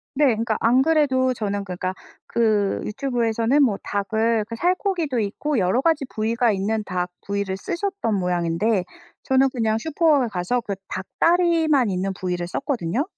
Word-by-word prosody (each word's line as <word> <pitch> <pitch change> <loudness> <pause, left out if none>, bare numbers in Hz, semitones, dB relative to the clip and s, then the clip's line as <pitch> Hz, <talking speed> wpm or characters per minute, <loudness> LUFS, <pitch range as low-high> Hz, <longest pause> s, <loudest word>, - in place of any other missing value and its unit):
네. 295 +1 +4
그러니까 225 -3 +1
안 250 +3 +4
그래도 270 -5 +2
저는 205 -3 -3
그러니까 185 0 -4 0.3
그 215 -4 +1
유튜브에서는 235 +2 +1
뭐 210 -7 +2
닭을 220 +2 0
그 230 - -5
살코기도 350 - 0
있고 240 +7 -2
여러 190 +7 +2
가지 320 -2 +1
부위가 230 +2 +1
있는 210 +2 -1
닭 180 -1 -3 0.2
부위를 200 -1 -2
쓰셨던 355 - -2
모양인데 180 +3 0 0.4
저는 265 +1 +3
그냥 225 -3 0
슈퍼에 310 -2 +2
가서 195 +6 -1
그 200 - -3
닭 190 - -4 0.2
다리만 330 -7 +3
있는 190 +1 -1
부위를 180 -2 -3
썼거든요. 245 - -2
225 Hz, 340 characters per minute, -23 LUFS, 200-275 Hz, 0.4 s, 네